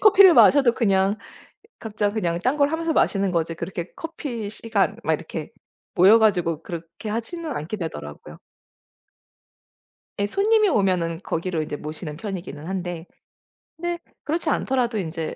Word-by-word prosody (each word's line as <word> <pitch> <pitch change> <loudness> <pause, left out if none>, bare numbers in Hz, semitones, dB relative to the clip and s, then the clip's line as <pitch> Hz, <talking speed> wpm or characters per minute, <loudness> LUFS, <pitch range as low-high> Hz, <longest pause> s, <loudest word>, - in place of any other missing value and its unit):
커피를 395 -3 +8
마셔도 270 -5 +6
그냥 195 -3 +2 0.6
각자 210 -2 -1
그냥 175 -6 -1
딴 255 +9 +1
걸 285 0 +2
하면서 325 0 -1
마시는 195 -8 +2
거지 165 -1 -1
그렇게 170 +1 -5
커피 265 -10 -5
시간 215 -2 0
막 160 - +2
이렇게 155 +2 -5 0.4
모여 195 +5 +7
가지고 175 -7 +2
그렇게 170 +6 -7
하지는 300 +9 -4
않게 160 +8 -5
되더라고요. 75 - -7 1.8
예 200 - +1
손님이 425 - +3
오면은 180 - +1
거기로 170 0 -2
이제 150 - -4
모시는 150 +1 -7
편이기는 170 -5 -6
한데 175 -2 -4 0.7
근데 345 +1 -3 0.2
그렇지 320 +1 -1
않더라도 250 -5 0
인제 165 -3 -4
200 Hz, 325 characters per minute, -23 LUFS, 170-255 Hz, 1.8 s, 커피를